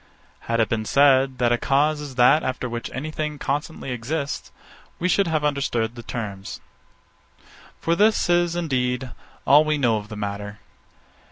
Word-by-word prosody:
_ -, -, -17 dB
Had 115 Hz, 0 st, 0 dB
it 110 Hz, -, +3 dB
been 110 Hz, -1 st, -2 dB
said, 135 Hz, 0 st, +4 dB
that 120 Hz, -1 st, +2 dB
a 120 Hz, -, +2 dB
cause 150 Hz, +2 st, +1 dB
is 140 Hz, -3 st, -8 dB
that 125 Hz, +5 st, +5 dB
after 130 Hz, -1 st, -3 dB
which 120 Hz, -1 st, -5 dB
any 150 Hz, +4 st, -5 dB
thing 150 Hz, -1 st, -3 dB
constantly 145 Hz, 0 st, -3 dB
exists; 140 Hz, +5 st, -4 dB, 0.5 s
we 180 Hz, -, -1 dB
should 195 Hz, 0 st, +2 dB
have 155 Hz, -2 st, 0 dB
understood 120 Hz, -6 st, 0 dB
the 120 Hz, -, -9 dB
terms. 100 Hz, -5 st, -6 dB, 1.2 s
For 165 Hz, -, +1 dB
this 215 Hz, +3 st, +3 dB
is, 175 Hz, -1 st, +2 dB
indeed, 130 Hz, -6 st, -1 dB, 0.3 s
all 145 Hz, +2 st, +7 dB
we 155 Hz, -1 st, 0 dB
know 120 Hz, -6 st, +2 dB
of 105 Hz, 0 st, -8 dB
the 110 Hz, -, -7 dB
matter. 100 Hz, 0 st, -5 dB
135 Hz, 170 wpm, -23 LUFS, 120-155 Hz, 1.2 s, all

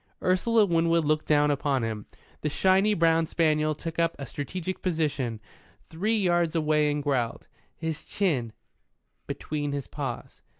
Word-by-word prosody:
Ursula 210 Hz, +4 st, +3 dB
Winwood 165 Hz, -2 st, +2 dB
looked 155 Hz, +1 st, +1 dB
down 150 Hz, -1 st, +4 dB
upon 140 Hz, -3 st, 0 dB
him. 110 Hz, -2 st, -4 dB, 0.3 s
The 150 Hz, -, 0 dB
shiny 190 Hz, +6 st, +3 dB
brown 165 Hz, -1 st, +3 dB
spaniel 155 Hz, -2 st, +1 dB
took 165 Hz, +2 st, -6 dB
up 165 Hz, 0 st, +2 dB
a 140 Hz, -, -6 dB
strategic 170 Hz, +8 st, -5 dB
position 145 Hz, -, -1 dB, 0.4 s
three 210 Hz, +8 st, -1 dB
yards 175 Hz, -4 st, +1 dB
away 150 Hz, -1 st, +2 dB
and 145 Hz, 0 st, -1 dB
growled, 130 Hz, -5 st, -1 dB, 0.3 s
his 160 Hz, -1 st, -4 dB
chin 140 Hz, -, -1 dB, 0.8 s
between 145 Hz, -2 st, -3 dB
his 140 Hz, -1 st, -3 dB
paws. 135 Hz, -5 st, -6 dB
155 Hz, 140 wpm, -27 LUFS, 145-170 Hz, 0.8 s, down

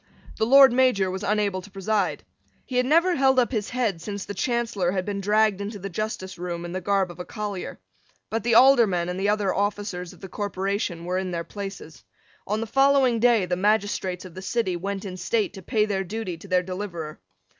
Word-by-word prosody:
The 220 Hz, -, +1 dB
Lord 270 Hz, 0 st, +8 dB
Major 245 Hz, -7 st, +3 dB
was 190 Hz, +1 st, -4 dB
unable 205 Hz, -2 st, 0 dB
to 195 Hz, -, -13 dB
preside. 200 Hz, 0 st, -1 dB, 0.4 s
He 250 Hz, -, -3 dB
had 250 Hz, 0 st, +2 dB
never 335 Hz, +5 st, +4 dB
held 265 Hz, -2 st, +3 dB
up 250 Hz, 0 st, +3 dB
his 215 Hz, -4 st, -2 dB
head 230 Hz, -9 st, -1 dB
since 200 Hz, +2 st, -5 dB
the 205 Hz, -, -5 dB
Chancellor 220 Hz, -3 st, -1 dB
had 185 Hz, -2 st, -1 dB
been 200 Hz, -1 st, -3 dB
dragged 210 Hz, 0 st, +2 dB
into 205 Hz, +1 st, -5 dB
the 195 Hz, 0 st, -7 dB
justice 190 Hz, -2 st, -4 dB
room 175 Hz, -1 st, -4 dB
in 175 Hz, -, -6 dB
the 185 Hz, +1 st, -3 dB
garb 195 Hz, -1 st, +1 dB
of 175 Hz, -, -14 dB
a -, -, -3 dB
collier. 205 Hz, -2 st, -5 dB, 0.5 s
But 225 Hz, -, 0 dB
the 235 Hz, +1 st, +2 dB
Aldermen 225 Hz, -10 st, +5 dB
and 180 Hz, +1 st, -3 dB
the 200 Hz, +1 st, +1 dB
other 205 Hz, -2 st, +1 dB
officers 200 Hz, -3 st, -2 dB
of -, -, -16 dB
the 190 Hz, -, -8 dB
corporation 195 Hz, -2 st, -3 dB
were 180 Hz, +1 st, -1 dB
in 190 Hz, -1 st, -3 dB
their 170 Hz, -1 st, -3 dB
places. 195 Hz, -5 st, -8 dB, 0.4 s
On 210 Hz, +2 st, -1 dB
the -, -, -2 dB
following 270 Hz, 0 st, +3 dB
day 230 Hz, -4 st, +4 dB
the 180 Hz, 0 st, -1 dB
magistrates 195 Hz, -2 st, 0 dB
of 180 Hz, -, -10 dB
the 185 Hz, -, -8 dB
City 190 Hz, -2 st, -1 dB
went 195 Hz, +3 st, -4 dB
in 185 Hz, -2 st, -6 dB
state 215 Hz, +3 st, 0 dB
to 190 Hz, -, -9 dB
pay 210 Hz, +4 st, +1 dB
their 195 Hz, -2 st, -1 dB
duty 195 Hz, -1 st, -4 dB
to 165 Hz, -, -13 dB
their 185 Hz, -1 st, +2 dB
deliverer. 180 Hz, -4 st, -6 dB
200 Hz, 215 wpm, -25 LUFS, 185-220 Hz, 0.5 s, Lord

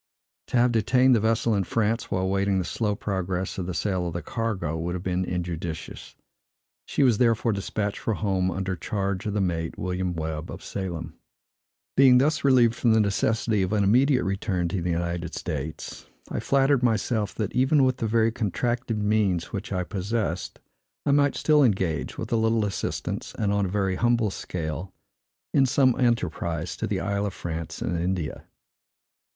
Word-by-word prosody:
To -, -, 0 dB
have 120 Hz, +1 st, +4 dB
detained 125 Hz, +3 st, +4 dB
the -, -, +3 dB
vessel 115 Hz, +1 st, +1 dB
in 100 Hz, -2 st, +1 dB
France, 115 Hz, +3 st, 0 dB
while 95 Hz, 0 st, 0 dB
waiting 100 Hz, 0 st, +1 dB
the 90 Hz, -, 0 dB
slow 105 Hz, +2 st, -1 dB
progress 95 Hz, -2 st, -3 dB
of 90 Hz, -, -3 dB
the 90 Hz, -, -4 dB
sale 95 Hz, -2 st, -1 dB
of 85 Hz, -, -4 dB
the 85 Hz, 0 st, -4 dB
cargo, 100 Hz, -7 st, -2 dB
would 85 Hz, +2 st, -3 dB
have 90 Hz, -, -5 dB
been 90 Hz, 0 st, 0 dB
injudicious; 85 Hz, -2 st, -5 dB
and -, -, -43 dB, 0.6 s
she -, -, +1 dB
was 120 Hz, -6 st, +4 dB
therefore 115 Hz, -1 st, +3 dB
despatched 100 Hz, +1 st, -2 dB
for 110 Hz, -, -1 dB
home, 95 Hz, -3 st, 0 dB
under 95 Hz, +1 st, -2 dB
charge 100 Hz, +2 st, -2 dB
of 105 Hz, -, -2 dB
the 105 Hz, -, +1 dB
mate, 85 Hz, -3 st, -2 dB
William 90 Hz, -1 st, -2 dB
Webb, 80 Hz, 0 st, -4 dB
of -, -, -8 dB
Salem. 85 Hz, -4 st, -5 dB, 0.8 s
Being 130 Hz, -2 st, +7 dB
thus 150 Hz, +4 st, +2 dB
relieved 125 Hz, -4 st, +5 dB
from 120 Hz, -1 st, +2 dB
the 110 Hz, -, +4 dB
necessity 105 Hz, +1 st, +1 dB
of 95 Hz, +2 st, 0 dB
an 105 Hz, -1 st, +2 dB
immediate 125 Hz, +6 st, +4 dB
return 95 Hz, -2 st, -1 dB
to 90 Hz, 0 st, -2 dB
the 90 Hz, -, -2 dB
United 85 Hz, 0 st, -2 dB
States, 75 Hz, -1 st, -5 dB, 0.2 s
I -, -, -1 dB
flattered 135 Hz, -1 st, +3 dB
myself, 110 Hz, -3 st, 0 dB
that, 105 Hz, -2 st, -2 dB
even 135 Hz, +3 st, +4 dB
with 130 Hz, -1 st, +2 dB
the 115 Hz, -, -1 dB
very 115 Hz, +1 st, +3 dB
contracted 115 Hz, 0 st, -1 dB
means 105 Hz, -5 st, +1 dB
which -, -, -4 dB
I 90 Hz, -, 0 dB
possessed, 100 Hz, -2 st, -3 dB, 0.5 s
I 145 Hz, -, +3 dB
might 145 Hz, 0 st, +3 dB
still 150 Hz, -2 st, +4 dB
engage, 95 Hz, -, 0 dB
with -, -, -5 dB
a 115 Hz, -, +3 dB
little 110 Hz, -1 st, +2 dB
assistance, 100 Hz, -, -3 dB
and 100 Hz, -2 st, +1 dB
on 100 Hz, -1 st, +1 dB
a -, -, -4 dB
very 95 Hz, -1 st, 0 dB
humble 120 Hz, -2 st, +2 dB
scale, 90 Hz, +1 st, -5 dB, 0.6 s
in 135 Hz, -2 st, +4 dB
some 130 Hz, 0 st, +4 dB
enterprise 85 Hz, -8 st, 0 dB
to -, -, -2 dB
the -, -, -1 dB
Isle 100 Hz, +1 st, -1 dB
of 100 Hz, -, -6 dB
France 80 Hz, -1 st, -5 dB
and 85 Hz, -, -1 dB
India. 90 Hz, -2 st, -3 dB
100 Hz, 180 wpm, -26 LUFS, 90-115 Hz, 0.8 s, Being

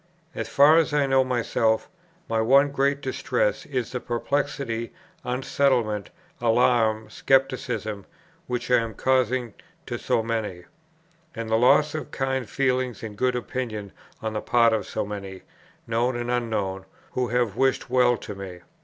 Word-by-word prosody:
As -, -, -4 dB
far 145 Hz, +3 st, +6 dB
as 160 Hz, -2 st, 0 dB
I 145 Hz, -1 st, +3 dB
know 135 Hz, -1 st, +4 dB
myself, 115 Hz, -3 st, 0 dB, 0.4 s
my 115 Hz, -1 st, +1 dB
one 140 Hz, +5 st, +5 dB
great 140 Hz, 0 st, +1 dB
distress -, -, -1 dB
is 125 Hz, -4 st, -2 dB
the 125 Hz, -, -3 dB
perplexity, 120 Hz, -1 st, -2 dB, 0.3 s
unsettlement, 125 Hz, -4 st, 0 dB, 0.3 s
alarm, 115 Hz, -2 st, +3 dB
scepticism, 125 Hz, -6 st, 0 dB, 0.4 s
which 125 Hz, 0 st, -3 dB
I 125 Hz, -, +7 dB
am 115 Hz, -2 st, -4 dB
causing 130 Hz, -2 st, +1 dB, 0.3 s
to -, -, -4 dB
so 110 Hz, -, +1 dB
many; 110 Hz, -6 st, -3 dB, 0.7 s
and 115 Hz, -1 st, -5 dB
the -, -, +4 dB
loss 135 Hz, +6 st, +4 dB
of 155 Hz, -1 st, -5 dB
kind 135 Hz, -4 st, -2 dB
feeling 130 Hz, -3 st, 0 dB
and 105 Hz, -2 st, -6 dB
good 125 Hz, +3 st, +1 dB
opinion 115 Hz, -5 st, -4 dB, 0.3 s
on 110 Hz, 0 st, -2 dB
the 105 Hz, -, -2 dB
part 115 Hz, -2 st, +4 dB
of 110 Hz, -, -1 dB
so -, -, -2 dB
many, 100 Hz, -2 st, -7 dB, 0.4 s
known 120 Hz, +2 st, 0 dB
and 120 Hz, 0 st, -2 dB
unknown, 105 Hz, -6 st, -2 dB, 0.3 s
who 125 Hz, -1 st, -1 dB
have 120 Hz, -3 st, 0 dB
wished 130 Hz, -1 st, +1 dB
well 125 Hz, -1 st, +4 dB
to -, -, -7 dB
me. 95 Hz, -3 st, -8 dB
120 Hz, 150 wpm, -25 LUFS, 110-130 Hz, 0.7 s, I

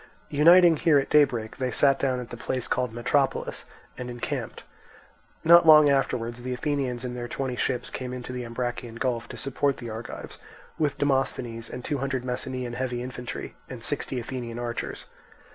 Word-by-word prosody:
Uniting 170 Hz, +3 st, +7 dB
here 160 Hz, -3 st, +4 dB
at 135 Hz, -, 0 dB
daybreak, 120 Hz, -7 st, +3 dB
they 130 Hz, -1 st, -1 dB
sat 135 Hz, +3 st, +3 dB
down 130 Hz, -2 st, 0 dB
at 125 Hz, -, -8 dB
the -, -, -5 dB
place 125 Hz, +1 st, -3 dB
called 125 Hz, -2 st, 0 dB
Metropolis, 130 Hz, +4 st, 0 dB, 0.3 s
and 125 Hz, -1 st, -5 dB
encamped. 120 Hz, -1 st, -4 dB, 0.8 s
Not 170 Hz, 0 st, +7 dB
long 150 Hz, -2 st, +9 dB
afterwards 120 Hz, -3 st, 0 dB
the 125 Hz, 0 st, -3 dB
Athenians 130 Hz, -3 st, -2 dB
in 125 Hz, -, -4 dB
the 120 Hz, -1 st, -5 dB
twenty 130 Hz, 0 st, -3 dB
ships 125 Hz, 0 st, -1 dB
came 125 Hz, -1 st, -5 dB
into 125 Hz, 0 st, -6 dB
the 125 Hz, 0 st, -4 dB
Ambracian 120 Hz, 0 st, -4 dB
Gulf 120 Hz, -2 st, -2 dB
to -, -, -8 dB
support 140 Hz, +1 st, 0 dB
the 120 Hz, -2 st, -7 dB
Argives, 110 Hz, +2 st, -8 dB, 0.4 s
with 150 Hz, -2 st, +1 dB
Demosthenes 130 Hz, -5 st, -1 dB
and 125 Hz, 0 st, -7 dB
two 145 Hz, -, -1 dB
hundred 135 Hz, -1 st, -2 dB
Messenian 125 Hz, -1 st, -3 dB
heavy 125 Hz, -1 st, -2 dB
infantry, 125 Hz, -1 st, -6 dB, 0.2 s
and 125 Hz, -3 st, -8 dB
sixty 130 Hz, 0 st, -1 dB
Athenian 120 Hz, -1 st, -5 dB
archers. 120 Hz, -1 st, -4 dB
125 Hz, 170 wpm, -26 LUFS, 120-135 Hz, 0.8 s, long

